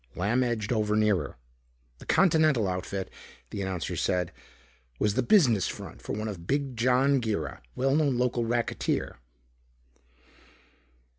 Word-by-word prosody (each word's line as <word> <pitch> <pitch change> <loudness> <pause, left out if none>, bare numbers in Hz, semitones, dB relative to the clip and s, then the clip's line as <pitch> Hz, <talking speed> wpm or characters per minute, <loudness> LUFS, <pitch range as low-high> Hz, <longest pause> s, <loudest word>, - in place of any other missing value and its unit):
Lamb 110 +8 +1
edged 120 -2 -1
over 105 -2 +1
nearer. 105 - +1 0.6
The - - -13
Continental 155 - +4
outfit, 95 +1 -3 0.4
the 100 - -4
announcer 95 -3 -3
said, 90 -2 0 0.7
was 105 +5 +1
the 130 - +1
business 130 - +4
front - - -8
of - - -2
one 110 0 -3
Big 135 +7 -1
John 130 +3 +3
Girra, 100 - -3
well 135 +2 +1
known 145 -5 +2
local 125 -1 +1
racketeer. 115 - -1
115 Hz, 125 wpm, -28 LUFS, 100-130 Hz, 0.7 s, Continental